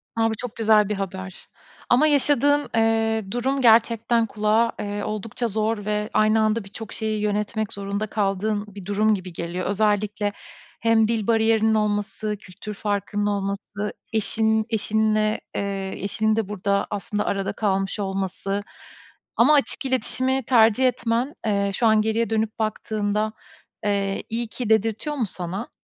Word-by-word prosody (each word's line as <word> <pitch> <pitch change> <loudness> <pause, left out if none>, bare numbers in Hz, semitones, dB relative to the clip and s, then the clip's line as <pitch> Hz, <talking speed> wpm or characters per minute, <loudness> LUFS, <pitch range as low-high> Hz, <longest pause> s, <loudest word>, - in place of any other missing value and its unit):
A, 225 0 +2
bu - - -1
çok 240 0 -7
güzel 215 -2 +4
bir 210 - 0
haber. 190 -1 -5 0.5
Ama 265 +6 +5
yaşadığın, 290 0 +3
ııı, 225 -2 +1
durum 265 +4 0
gerçekten 230 0 +4
kulağa, 215 +2 +1
ııı, 205 0 -3
oldukça 215 +3 -3
zor 215 0 -1
ve 210 0 -1
aynı 215 +1 +4
anda 215 0 +1
birçok 205 +2 -8
şeyi 215 -1 -2
yönetmek 210 +1 -1
zorunda 200 +1 -3
kaldığın 205 0 -1
bir 200 -3 -9
durum 210 +2 +2
gibi 185 -2 -7
geliyor. 170 +2 -4
Özellikle 205 0 +1 0.5
hem 225 -1 +3
dil 225 -2 -1
bariyerinin 220 -1 +3
olması, 210 0 -1
kültür 200 +3 -9
farkının 205 0 -2
olması, 200 +1 -3 0.2
eşinin 220 0 +2
eşinle, 215 -1 +1
eee, 195 -1 -3
eşinin 220 +2 +1
de 220 -3 -1
burada 200 -1 0
aslında 210 +1 -3
arada 195 -1 -1
kalmış 195 -1 -1
olması 195 0 -2 0.7
ama 260 +6 +6
açık 285 -1 +1
iletişimi 260 0 0
tercih 230 +1 +4
etmen, 245 +2 0
eee, 200 -2 +1
şu 230 - +2
an 220 -1 +5
geriye 220 +1 0
dönüp 220 0 -1
baktığında, 215 0 -1 0.5
eee, 200 -1 0
iyi 235 +1 -2
ki 230 0 -5
dedirtiyor 225 +7 +1
mu 250 -5 0
sana? 185 +5 -4
215 Hz, 145 wpm, -23 LUFS, 205-225 Hz, 0.7 s, ama